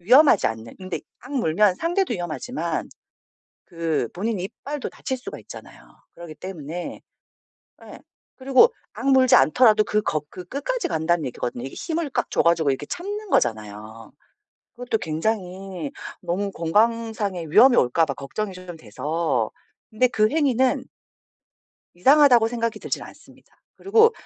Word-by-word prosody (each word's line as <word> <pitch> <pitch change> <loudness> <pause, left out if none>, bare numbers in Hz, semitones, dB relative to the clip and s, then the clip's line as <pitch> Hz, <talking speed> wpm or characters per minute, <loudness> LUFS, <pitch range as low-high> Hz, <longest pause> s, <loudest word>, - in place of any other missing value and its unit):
위험하지 250 - +6
않는 110 +1 -8
근데 185 -1 -5 0.2
악 260 +3 -11
물면 200 - +2
상대도 350 -2 0
위험하지만 175 - -4 0.8
그 165 -8 -2
본인 210 +2 -2
이빨도 280 +9 -5
다칠 260 -1 -4
수가 250 - -8
있잖아요. - - -12 0.3
그러기 170 -2 -10
때문에 170 0 -7 0.8
예 - - -11 0.4
그리고 270 - +5 0.2
악 275 - -3
물지 260 -1 +6
않더라도 215 - +5
그 210 - +1
거 155 -6 -1
그 180 - -9
끝까지 295 - -3
간다는 160 -1 0
얘기거든요. 120 -1 -4
이게 135 - -7
힘을 325 -3 -3
꽉 - - -2
줘가지고 165 -4 +2
이렇게 135 +2 -3
참는 410 - -5
거잖아요. 110 +1 -2 0.6
그것도 245 -2 -2
굉장히 180 -1 -3 0.3
너무 185 +3 -2
건강상의 210 -1 0
위험이 245 - +7
올까 155 +7 +3
봐 140 - -3
걱정이 190 +10 -5
좀 180 -2 -9
돼서. 150 -5 -2 0.4
근데 245 +3 +2
그 215 -3 +2
행위는 265 -5 +2 1.1
이상하다고 250 +2 +5
생각이 230 -1 -3
들진 - - -3
않습니다. - - -16 0.2
그리고 450 +3 +4
195 Hz, 320 characters per minute, -23 LUFS, 160-255 Hz, 1.1 s, 위험이